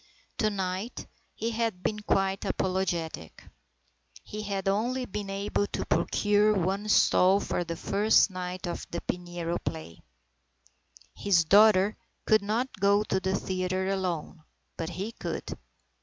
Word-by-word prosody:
To 215 - +3
night 190 +2 -4 0.3
he 230 +1 -2
had 225 -5 -2
been 210 -1 -1
quite 195 -2 0
apologetic. 175 - -2 0.8
He 215 - -6
had 200 -2 -3
only 240 +6 0
been 205 -2 -5
able 200 +1 -1
to - - -4
procure 210 +1 +2
one 195 +3 -1
stall 190 -1 +5
for 180 - -2
the 170 0 -5
first 205 +4 +3
night 180 0 -5
of 175 - -5
the 170 - -4
Pinero 175 -1 -3
play. 155 - -6 1.1
His 180 -5 +2
daughter 205 +1 +5 0.3
could 215 -1 +4
not 220 +3 -2
go 200 +1 +4
to 190 - 0
the 190 0 -1
theatre 185 0 -1
alone, 180 -4 -3 0.3
but 165 0 -4
he 190 +6 -4
could. 175 -7 -5
195 Hz, 135 wpm, -28 LUFS, 180-210 Hz, 1.1 s, stall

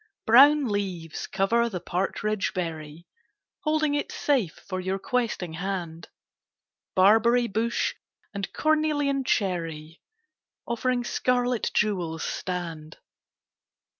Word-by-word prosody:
Brown 280 +5 +7
leaves 185 -6 -3
cover 230 +5 +1
the 185 -5 -4
partridge 195 +4 -2
berry, 160 -2 -5 0.3
\ - - -62
Holding 310 -1 +1
it 290 - -2
safe 250 - 0
for 185 -1 -3
your 190 +1 -2
questing 195 -5 -2
hand. 175 -2 -5 0.9
Barberry 225 +6 +5
bush 230 +2 -1 0.4
and 200 -2 -4
cornelian 300 -3 +1
cherry 165 -8 -2 0.6
Offering 245 +1 -1
scarlet 245 -1 0
jewels 175 -6 0
stand. 165 -4 -5
200 Hz, 100 wpm, -26 LUFS, 175-245 Hz, 0.9 s, Brown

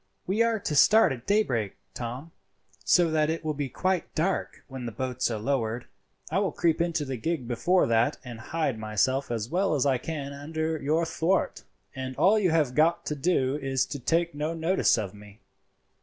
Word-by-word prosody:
"We 200 +5 0
are 230 -1 +2
to 170 - -3
start 215 +10 +6
at 125 -2 -6
daybreak, 125 - +1 0.2
Tom, 125 +7 -6 0.5
so 175 -3 +4
that 155 -1 +2
it 165 0 -3
will 155 - 0
be 145 -2 -3
quite 185 +5 -1
dark 160 -4 -1
when 130 -3 -6
the - - -4
boats 130 +3 -2
are 115 - -2
lowered. 115 0 -1 0.5
I 180 - +2
will 195 -4 0
creep 165 0 +1
into 165 -3 0
the 135 -2 -4
gig 145 0 -2
before 175 +10 +2
that 115 0 +2
and 120 -2 -8
hide 135 -1 -2
myself 110 +6 0
as 115 -2 -2
well 180 0 +1
as 145 - +1
I 135 -3 +2
can 140 -1 -5
under 160 +2 -3
your 155 +4 +1
thwart, 170 +3 0 0.3
and 130 -1 -5
all 205 +9 +4
you 190 -4 +2
have 155 -6 +2
got 160 +4 +2
to 150 - -2
do 140 -3 +1
is 135 -3 0
to 145 - -6
take 170 +6 +1
no 150 +3 -3
notice 165 -1 +2
of 105 -3 -3
me. 105 +1 -14
145 Hz, 195 wpm, -27 LUFS, 125-165 Hz, 0.5 s, start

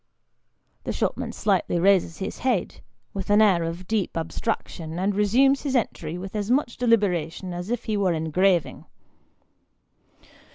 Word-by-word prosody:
The - - -3
shop - - -1
man - - -5
slightly 190 -4 0
raises 185 -3 +3
his 190 - -5
head, 245 -8 -1 0.3
with 195 -1 -5
an 205 +1 +5
air 200 -6 +5
of 165 +2 -5
deep 210 -5 -1
abstraction, 165 -1 -4
and 195 +3 0
resumes 250 +7 +3
his 275 -2 -2
entry 170 -8 -2
with 190 +3 -7
as 205 0 -2
much 255 -1 +1
deliberation 185 -7 0
as 175 +3 -6
if 240 0 -2
he 220 - -2
were 195 -3 +2
engraving. 165 +2 +1
195 Hz, 150 wpm, -24 LUFS, 175-220 Hz, 0.3 s, an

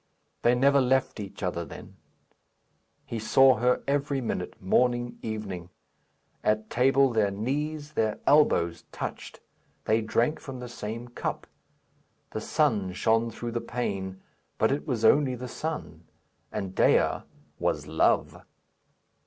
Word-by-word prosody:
They 120 +1 +4
never 140 +2 +4
left 130 -2 +1
each 100 -1 -7
other 90 -2 -1
then; - - -11 1.1
he 115 - -4
saw 130 +3 +5
her 125 +2 +2
every 140 0 0
minute, 110 -7 -4
morning, 120 +5 +1
evening. 100 -6 -5 0.7
At 110 0 0
table 135 +2 +4
their 105 -3 +3
knees, 145 +8 -3
their 110 -7 0
elbows, 85 - +3
touched; - - -6 0.4
they 110 +1 +3
drank 120 +7 +1
from 130 -2 -8
the 125 -1 -7
same 115 +1 -6
cup; 120 - -4 0.9
the - - -4
sun 95 -3 +1
shone 115 +4 +2
through 120 +1 -5
the 120 0 -2
pane, 95 -6 -3 0.4
but 110 - +3
it 140 - -2
was 115 -5 0
only 135 +1 +4
the 125 +1 -6
sun, 160 +5 -5 0.5
and 95 -2 -4
Dea - - +3 0.4
was - - 0
Love. - - +1
120 Hz, 130 wpm, -27 LUFS, 105-135 Hz, 1.1 s, saw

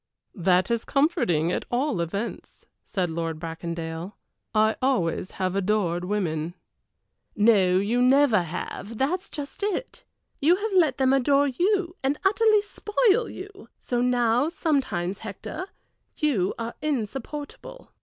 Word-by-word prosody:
"That 185 +1 +2
is 235 -1 0
comforting, 180 - +1
at - - -2
all 245 - 0
events," 200 +7 -5 0.2
said 180 -5 -2
Lord 165 -1 -3
Bracondale. 165 +2 -5 0.4
"I 215 0 +3
always 190 -9 0
have 185 0 -2
adored 185 -3 0
women." 175 -4 -2 0.8
"No, 200 -4 +4
you 220 +6 +1
never 255 -4 +5
have, 180 +6 -6
that 290 +9 +1
is 380 - -12
just 290 +3 -7
it. 415 +4 -3 0.4
You 325 +5 +5
have 410 +2 -3
let 320 -8 +4
them 265 0 +3
adore 275 +2 +3
you, 355 +5 0
and 275 +2 0
utterly 430 +1 +4
spoil 425 +2 +1
you; 400 +1 -10
so 245 -1 -2
now 245 +2 +2
sometimes, 260 - -1
Hector, 220 - -6 0.5
you 230 - +1
are 230 0 -4
insupportable." 295 - -5
240 Hz, 130 wpm, -25 LUFS, 185-300 Hz, 0.8 s, never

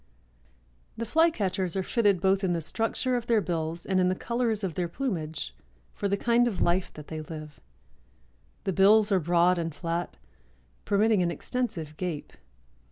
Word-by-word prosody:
'" 60 -1 -36
The 230 - -3
Flycatchers 200 - +1
are 190 - 0
fitted 205 -3 +2
both 195 +1 +2
in 180 -2 +1
the 170 - -1
structure 225 - 0
of 240 -1 -3
their 230 -2 +4
bills 170 -3 -3
and 190 -1 +1
in 180 0 +3
the 185 - 0
colors 235 -1 -1
of 185 -4 -2
their 175 +2 -1
plumage 165 - -3 0.4
for 200 - -2
the 200 0 0
kind 240 +2 +3
of 200 -7 -3
life 175 +2 +1
that 150 - -10
they 155 -1 -4
live. 155 -1 -9 1.0
The 195 -2 -1
bills 205 +3 +5
are 190 - +4
broad 175 +2 +3
and 165 -2 -3
flat, 170 0 -3 0.7
permitting 210 0 +3
an 175 - +1
extensive 170 - -3
gape. 175 -5 -4
185 Hz, 170 wpm, -28 LUFS, 165-215 Hz, 1.0 s, bills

